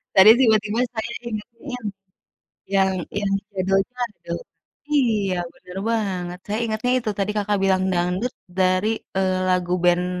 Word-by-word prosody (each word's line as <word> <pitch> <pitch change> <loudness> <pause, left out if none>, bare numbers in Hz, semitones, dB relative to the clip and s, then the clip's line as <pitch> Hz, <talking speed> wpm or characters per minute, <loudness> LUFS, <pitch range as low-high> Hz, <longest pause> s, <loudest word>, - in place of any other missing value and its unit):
Tadi 190 +2 +9
tiba-tiba 220 -2 +3
saya 225 0 -3 0.2
ingatnya 230 +4 -7
yang 250 - -6 0.9
yang 190 0 +4 0.3
yang 200 -1 -1 0.2
judul 195 0 +2
dangdut, 250 - -5 0.5
iya, 215 -9 +2 0.2
bener 180 +1 -11
banget, 185 -5 -1
saya 210 +2 -2
ingatnya 220 +3 -1
itu 220 - -2
tadi 200 +1 +1
Kakak 205 0 +1
bilang 190 -1 +3
dangdut 180 +7 0 0.2
dari, 185 +2 +3 0.3
eee, 185 -1 +2
lagu 180 -1 +1
band 175 0 +4
205 Hz, 135 wpm, -23 LUFS, 185-225 Hz, 0.9 s, Tadi